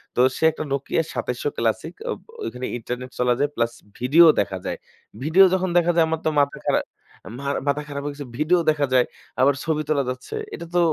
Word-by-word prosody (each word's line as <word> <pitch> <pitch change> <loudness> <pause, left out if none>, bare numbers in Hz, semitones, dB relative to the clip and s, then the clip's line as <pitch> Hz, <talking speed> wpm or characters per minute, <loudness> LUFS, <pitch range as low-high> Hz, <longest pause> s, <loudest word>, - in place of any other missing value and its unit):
তো 125 - +3
সে - - -5
একটা 155 - -5
Nokia 140 +4 0
২৭০০ 445 -3 -2
classic - - -1 0.2
আব - - -2
অ - - -22
ঐখানে 125 +1 -5
ইন্টারনেট 125 +2 -5
চলা 125 0 +3
যায় 145 0 +2
প্লাস 115 0 +1 0.3
ভিডিও 145 +8 +6
দেখা 95 -1 -1
যায়। - - -3 0.5
ভিডিও 165 +6 +6
যখন 185 0 +1
দেখা 175 0 +4
যায় 165 - +5
আমার 160 0 -1
তো - - +4
মাথা 140 0 -1
খারা - - +3 0.9
মাথা 145 +1 +1
খারাপ 140 -1 -5
হয়ে 145 - -3
গেছে। 145 0 -7
ভিডিও 165 +4 +3
দেখা 145 -2 +2
যায়, 125 -1 +5 0.4
আবার 140 +2 +5
ছবি 155 -2 0
তোলা 145 -3 +2
যাচ্ছে। 130 - -6 0.2
এটা 170 - -6
তো 175 - +5
145 Hz, 205 wpm, -23 LUFS, 130-165 Hz, 0.9 s, ভিডিও